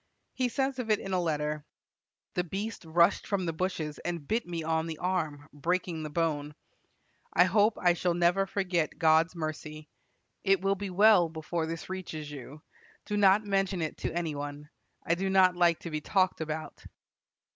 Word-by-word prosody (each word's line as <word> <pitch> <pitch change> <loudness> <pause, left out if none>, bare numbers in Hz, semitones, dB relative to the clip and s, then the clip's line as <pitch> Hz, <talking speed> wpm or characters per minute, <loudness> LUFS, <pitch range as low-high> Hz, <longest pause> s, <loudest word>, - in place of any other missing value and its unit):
He 255 -1 0
says 270 +1 -1
of 235 -3 -4
it 215 - +4
in 195 -1 -5
a 180 - +2
letter: 150 -2 -1 0.7
"The 180 - 0
beast 195 +3 -5
rushed 170 +3 +3
from 200 -3 0
the 165 - -1
bushes 160 -3 -3
and 170 -5 -4
bit 225 -2 0
me 170 -2 -4
on 160 0 0
the 160 -1 -5
arm, 155 -5 -2
breaking 170 +2 -1
the 155 - -4
bone. 150 -2 -1 0.8
I 175 - +6
hope 210 +4 +3
I 175 -1 +4
shall 175 0 0
never 175 +3 +2
forget 180 -5 -1
God's 160 +1 +4
mercy. 155 -1 -5 0.5
It 195 -1 +4
will 195 0 +2
be 200 0 -5
well 190 -2 +5
before 160 +1 -3
this 165 0 -5
reaches 160 -5 -6
you. 145 +2 -10 0.4
Do 210 - -2
not 205 +1 +5
mention 195 -2 0
it 155 - -4
to - - -3
any 170 -3 -1
one. 145 +1 -6 0.3
I 170 - +2
do 190 +3 -1
not 185 -1 +5
like 175 -2 +4
to 170 - -6
be 155 0 -2
talked 185 0 +1
about." 155 0 -5
175 Hz, 180 wpm, -29 LUFS, 155-190 Hz, 0.8 s, I